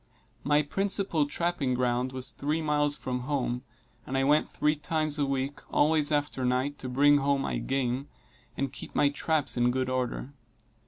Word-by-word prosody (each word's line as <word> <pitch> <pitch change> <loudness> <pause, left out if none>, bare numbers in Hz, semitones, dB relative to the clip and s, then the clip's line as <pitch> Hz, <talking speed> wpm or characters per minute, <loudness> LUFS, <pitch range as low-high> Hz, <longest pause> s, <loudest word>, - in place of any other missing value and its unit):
My 145 +1 +3
principal 190 -2 +1
trapping 145 -5 0
ground 125 +1 0
was 130 0 -4
three 150 +3 -2
miles 150 -2 +1
from 125 -3 -3
home, 125 -2 -2 0.5
and 135 - -2
I 135 - +2
went 150 +3 +3
three 150 0 +1
times 155 0 -1
a 140 - +1
week, 135 +1 -2
always 150 0 +3
after 145 -3 0
night, 130 +3 0
to 130 - -5
bring 145 +3 +5
home 140 0 +1
my - - -2
game, 135 +1 -1 0.5
and 140 -1 -2
keep - - -7
my 145 - +4
traps 150 -1 0
in 120 0 +3
good 130 +1 -1
order. 130 +1 -2
140 Hz, 170 wpm, -28 LUFS, 130-150 Hz, 0.5 s, bring